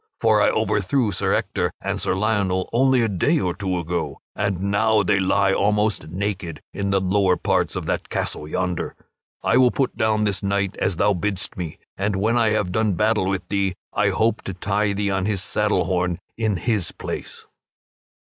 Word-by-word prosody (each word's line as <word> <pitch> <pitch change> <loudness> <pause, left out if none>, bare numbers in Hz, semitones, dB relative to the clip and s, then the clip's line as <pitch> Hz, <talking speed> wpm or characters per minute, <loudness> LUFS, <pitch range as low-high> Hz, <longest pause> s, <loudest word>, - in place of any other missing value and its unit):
For - - +4
I - - +5
overthrew 105 +3 +1
Sir 90 - +1
Ector - - -1
and - - -2
Sir - - 0
Lionel 95 -3 0
only 130 0 +4
a - - +2
day 110 - +1
or 90 -1 0
two 95 -2 -2
ago, 85 -4 -3 0.2
and 100 -3 -1
now 105 +2 +2
they 100 +2 +2
lie 95 +1 +2
almost 105 -2 +1
naked 90 -2 -3
in 100 0 -2
the 95 0 +3
lower 95 -1 +2
parts - - 0
of - - -3
that - - -2
castle 75 - -3
yonder. 90 +2 -2 0.5
I 115 - +3
will 130 -1 +6
put 135 +1 -1
down 110 -1 +1
this 105 -2 0
knight 100 -1 0
as 90 - 0
thou 105 - +3
biddst 95 +1 -3
me, 85 -4 -5 0.2
and 100 +1 0
when 110 +5 +1
I 115 -2 +3
have 105 -4 0
done 110 +1 +1
battle 105 +1 +1
with 95 -2 -2
thee 100 -2 0 0.2
I 105 0 +2
hope 110 +4 +1
to 95 - -4
tie 100 +2 0
thee 100 0 -1
on 95 0 0
his 100 -3 -1
saddle 105 -4 +1
horn 90 -1 0 0.2
in 110 -4 0
his 105 -6 -1
place." - - -7
100 Hz, 190 wpm, -22 LUFS, 95-105 Hz, 0.5 s, will